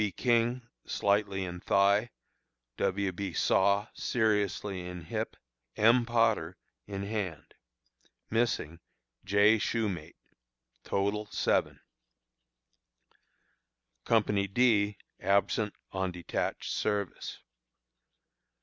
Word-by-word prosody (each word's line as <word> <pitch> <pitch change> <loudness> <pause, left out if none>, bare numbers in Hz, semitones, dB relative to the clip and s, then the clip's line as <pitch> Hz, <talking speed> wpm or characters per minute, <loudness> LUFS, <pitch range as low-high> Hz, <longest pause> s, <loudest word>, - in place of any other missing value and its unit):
B. 105 -2 +1
King, 120 +2 +1 0.2
slightly 100 -1 0
in 90 0 -6
thigh; 100 +5 +3 0.7
W. 100 0 0
B. 95 0 -5
Saw, 100 +4 +3
seriously 105 -4 0
in 90 0 -7
hip; - - -4 0.4
M. 115 +2 +4
Potter, 115 -7 +1 0.3
in 100 -1 -4
hand. 100 -7 -4 0.8
Missing: 110 -8 0 0.4
J. 100 +3 +4
Shumate. 100 -8 -2 0.7
Total, 100 +2 -1
7. - - 0 2.2
Company 105 -3 +2
D, 105 -1 +3 0.2
absent 100 +2 +1 0.2
on 95 -1 -1
detached 90 -1 -3
service. 100 -3 -2
100 Hz, 85 wpm, -30 LUFS, 95-110 Hz, 2.2 s, M